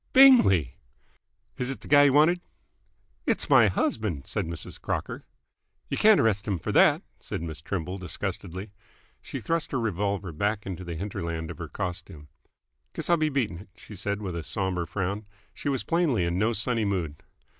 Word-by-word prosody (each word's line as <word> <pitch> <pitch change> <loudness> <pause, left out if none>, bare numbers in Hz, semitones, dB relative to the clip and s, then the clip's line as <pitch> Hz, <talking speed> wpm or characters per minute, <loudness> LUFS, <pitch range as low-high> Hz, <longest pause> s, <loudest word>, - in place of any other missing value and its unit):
"Bingley!" 235 - +7 0.8
"Is 125 0 -1
't 135 - -2
th' - - -13
guy 145 -1 +7
y' - - +6
wanted?" 155 +6 +4 0.9
"It's - - 0
my 110 - +7
husband!" 90 -5 -1
said - - -2
Mrs. 85 -1 -6
Crocker. - - -4 0.6
"Y' - - -1
can't 215 -1 +6
arrest 105 -2 +1
'm 100 -3 0
f'r - - -4
that!" - - +5 0.2
said - - -5
Miss 80 -2 -6
Trimble 90 +2 -4
disgustedly. 95 +1 -5 0.5
She - - -6
thrust 165 -1 -2
her 130 - +1
revolver 100 -3 -1
back 100 +6 -1
into 95 -2 -5
the 85 -2 -5
hinterland 85 -3 -4
of 85 - -10
her 85 - -5
costume. 85 -5 -6 0.6
"Guess - - -2
I'll 170 - +5
be 155 -1 +1
beatin' 120 - -1
it," 100 - -13
she 105 - -12
said 100 +2 -2
with 90 -3 -4
a 85 - -3
sombre 90 0 -2
frown. 100 +4 -3 0.3
She 145 - -3
was 135 -3 0
plainly 165 - +1
in 85 +1 0
no 110 +3 +2
sunny 115 +1 0
mood. 90 -7 -2
100 Hz, 175 wpm, -27 LUFS, 85-120 Hz, 0.9 s, Bingley